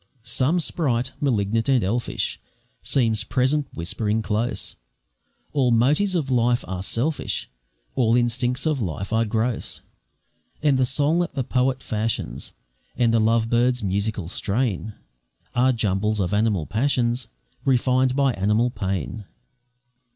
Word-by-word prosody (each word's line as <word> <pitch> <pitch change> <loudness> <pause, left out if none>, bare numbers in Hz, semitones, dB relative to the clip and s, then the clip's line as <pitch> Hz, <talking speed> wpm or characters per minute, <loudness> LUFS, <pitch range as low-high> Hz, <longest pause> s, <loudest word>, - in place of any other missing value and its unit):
Some 130 +8 +1
sprite, 130 -7 0
malignant 115 -3 +1
and 130 -4 +4
elfish, 115 +6 -1 0.4
Seems 115 -5 +1
present 130 +4 +1
whispering 105 +5 -1
close, 105 +4 -2 0.8
"All 135 -4 +3
motives 145 - +3
of 145 -6 -1
life 120 0 +2
are 90 0 -4
selfish, 130 +10 -1 0.4
All 115 -2 +3
instincts 125 +2 0
of 155 -5 +1
life 100 +2 -3
are 115 +1 +3
gross; 110 +2 -2 0.8
And 140 -3 +3
the 130 - +3
song 145 +6 +2
that 175 - -2
the 135 - 0
poet 130 +1 0
fashions, 105 - -2 0.4
And 120 -2 +3
the 115 - +4
love 115 +1 +2
bird's 120 +1 +2
musical 100 -1 -1
strain, 105 +2 -1 0.6
Are 125 +2 +4
jumbles 105 -2 0
of 95 0 0
animal 105 -6 +1
passions, 120 - 0 0.4
Refined 130 -1 +2
by 135 -2 +3
animal 105 +5 +1
pain." 95 - -3
120 Hz, 130 wpm, -23 LUFS, 105-130 Hz, 0.8 s, and